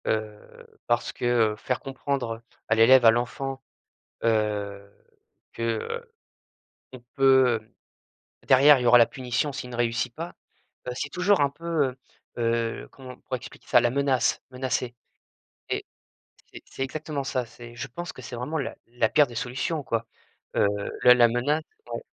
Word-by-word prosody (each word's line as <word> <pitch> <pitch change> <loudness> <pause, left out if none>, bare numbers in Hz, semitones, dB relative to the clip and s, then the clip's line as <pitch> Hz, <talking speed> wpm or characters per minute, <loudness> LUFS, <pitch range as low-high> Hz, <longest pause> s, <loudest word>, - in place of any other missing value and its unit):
Heu, 110 -1 -5
parce 120 0 0
que, - - -5 0.3
heu, - - -8
faire 125 +3 -2
comprendre 135 -4 -3 0.3
à 110 - +3
l'élève, 120 +2 +7
à 115 - +9
l'enfant, 130 +3 -3 0.6
heu, 105 -3 -1 0.6
que, 115 - -7
heu 455 - -3 0.8
qu'on 125 -2 -12
peut, 130 -2 +5
heu 110 - -28 0.7
derrière 135 +2 +7
il - - -3
y - - -1
aura 120 0 +8
la 120 - +7
punition, 130 +4 -2
s'il 125 - -6
ne 120 - -7
réussit 120 0 0
pas, 165 +5 -6 0.5
bah, 125 - -3
c'est 145 - -3
toujours 180 +1 +2
un 140 - +3
peu, 160 -1 -1 0.5
heu - - -2 0.4
heu - - -12
comment 130 -2 -11
on - - -17
pourrait 130 - -4
expliquer - - -13
ça, - - +6
la 120 - +2
menace, 135 -1 +1
menacer 125 -1 -2 0.8
et - - -2 0.7
c'est - - -10
c'est - - -10
exactement 145 +1 -4
ça, 130 -2 -1
c'est 120 0 -13
je 120 +3 -5
pense 175 +7 -7
que - - -11
c'est 125 - -7
vraiment 130 +7 -3
la 140 - -3
la 115 -2 0
pire 150 -2 +4
des 120 - -11
solutions, 135 +6 -2
quoi, 115 -3 -2 0.5
heu, - - +4 0.4
la 125 - +9
la 120 -1 +6
menace 135 +7 0 0.2
donc - - -5
125 Hz, 170 wpm, -26 LUFS, 120-140 Hz, 0.8 s, à